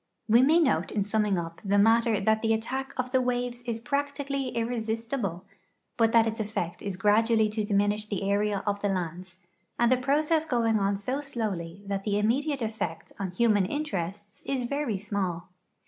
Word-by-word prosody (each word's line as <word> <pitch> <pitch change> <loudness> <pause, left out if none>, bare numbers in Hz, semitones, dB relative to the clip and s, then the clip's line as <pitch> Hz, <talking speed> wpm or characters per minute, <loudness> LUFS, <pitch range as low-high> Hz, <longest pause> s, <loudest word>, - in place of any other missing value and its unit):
We 230 +2 +6
may 300 +6 +5
note 320 -6 +2
in 205 - 0
summing 210 -1 +1
up 165 -1 -5
the 200 0 +2
matter 225 +1 +4
that 220 +2 +2
the 225 -1 +2
attack 260 +5 -3
of 255 -1 -2
the 260 -1 +3
waves 245 -1 -1
is 230 -1 -2
practically 280 +1 -2
irresistible, 230 -4 -2 0.5
but 225 -2 +3
that 230 -1 +5
its 225 +1 -3
effect 205 -5 -3
is 200 -3 -4
graduall}' 215 +2 +3
to 215 0 -1
diminish 205 +1 +1
the 200 -2 -3
area 200 0 +1
of 205 -1 -1
the 205 - +1
lands, 185 0 -4 0.4
the 240 +2 +4
process 300 +5 +2
going 230 -7 +1
on 200 0 +1
so 255 +8 -3
slowly 200 -9 -4
that 195 -1 -3
the 205 -1 0
immediate 265 +6 +1
effect 210 -7 -4
on 195 -2 -2
human 205 0 +2
interests 205 - -4
is 265 -2 -1
veiy 245 -5 -2
small. 190 -4 -3
220 Hz, 175 wpm, -28 LUFS, 200-245 Hz, 0.5 s, We